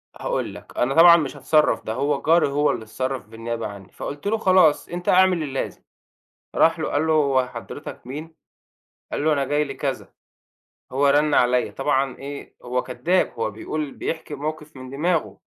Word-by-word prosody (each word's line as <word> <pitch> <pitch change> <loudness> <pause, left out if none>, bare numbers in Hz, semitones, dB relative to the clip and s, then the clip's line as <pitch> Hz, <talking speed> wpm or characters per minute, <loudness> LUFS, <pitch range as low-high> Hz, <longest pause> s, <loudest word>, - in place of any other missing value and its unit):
هاقول - - -3
لك، - - -13
أنا 130 +3 +1
طبعًا 170 +1 +8
مش 150 -3 -3
هاتصرّف 150 +3 +2
ده 110 - -2
هو 140 +3 0
جَاري 165 +1 +4
هو 145 +1 +2
اللي - - -4
اتصرّف 130 +4 -4
بالنيابة 115 +1 -5
عنّي 100 -2 -11
فقُلت 145 +7 -6
له 225 +2 +1
خلاص 185 -7 +4
أنت 175 +1 -4
اعمل 185 -3 +4
اللازم. 135 -2 -4 0.7
راح 165 0 +4
له 155 - -2
قال 150 +2 +1
له: 160 - +3
"هو 140 -4 +2
حضرتك 120 - -9
مين؟" 155 +5 -7 0.8
قال 145 - -2
له: 155 - +4
"أنا 140 -2 +1
جاي 145 +2 +1
لكذا - - -4 0.8
هو 140 +2 +3
رَن 145 +1 +3
عليّا"، 125 0 +3
طبعًا 135 -1 0
إيه 140 +1 -8
هو 125 +1 -1
كداب، 175 +8 0
هو 115 - -1
بيقول 145 +7 -4
بيحكي 160 -2 -5
موقف 155 +1 -6
من 130 0 -9
دماغه، 140 - -1
145 Hz, 175 wpm, -23 LUFS, 130-160 Hz, 0.8 s, طبعًا